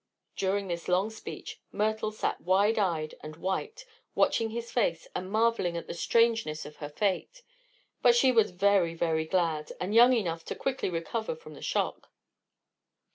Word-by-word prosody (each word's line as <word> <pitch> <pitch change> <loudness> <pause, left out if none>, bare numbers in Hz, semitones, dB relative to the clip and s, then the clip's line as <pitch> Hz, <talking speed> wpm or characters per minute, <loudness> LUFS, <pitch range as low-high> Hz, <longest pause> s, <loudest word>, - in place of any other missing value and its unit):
During 195 +1 0
this 170 -1 -4
long 185 +4 +2
speech 220 - -8
Myrtle 215 +1 0
had 215 - -14
sat - - -1
wide 200 +5 +3
eyed 165 -6 0
and 155 0 -8
white, 190 - -3 0.3
watching 225 -1 +2
his 235 +1 -5
face 170 -9 0
and 185 +1 -4
marveling 220 -6 +1
at 170 - -5
the - - -6
strangeness 225 -4 +1
of 150 - -11
her 145 - -6
fate. 205 - -2 0.6
But 240 -1 +6
she 260 +2 +5
was 225 -4 +4
very, 180 -2 +2
very 160 -1 0
glad, 160 -3 0
and 185 +3 -2
young 240 +3 +7
enough 170 -8 -1
to - - -4
quickly 270 -6 -2
recover 180 - -3
from 470 0 -13
the - - -12
shock. - - -2
195 Hz, 170 wpm, -29 LUFS, 170-230 Hz, 0.6 s, young